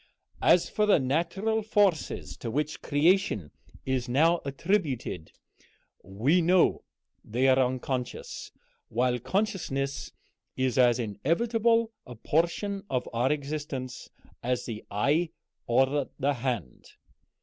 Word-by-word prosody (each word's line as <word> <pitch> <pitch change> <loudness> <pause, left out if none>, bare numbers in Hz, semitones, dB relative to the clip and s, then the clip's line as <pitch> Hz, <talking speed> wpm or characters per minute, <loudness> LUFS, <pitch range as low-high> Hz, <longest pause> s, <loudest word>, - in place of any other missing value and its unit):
As - - +5
for 210 -1 0
the 205 - +6
natural 170 +11 0
forces 205 -6 +1
to 115 - -5
which 150 +6 -1
all - - -13
creation 145 - +2 0.3
is 130 -2 -1
now 165 +7 +3
attributed, 140 - -1 0.7
we 120 - +2
know 180 +2 +3 0.4
they 125 +4 +1
are 130 0 +5
unconscious, 130 0 -2 0.4
while 125 +1 +1
consciousness 140 - -2 0.5
is 130 -2 +1
as 120 -2 +5
inevitable 225 - +1 0.2
a 125 - -9
portion 175 - -1
of 125 -1 -1
our 120 +4 +2
existence 145 -3 -4 0.3
as 125 0 -1
the 110 -3 -6
eye 145 +11 +1 0.4
or 135 +3 +2
the 145 +2 +1
hand. 120 - -4
135 Hz, 115 wpm, -28 LUFS, 125-175 Hz, 0.7 s, the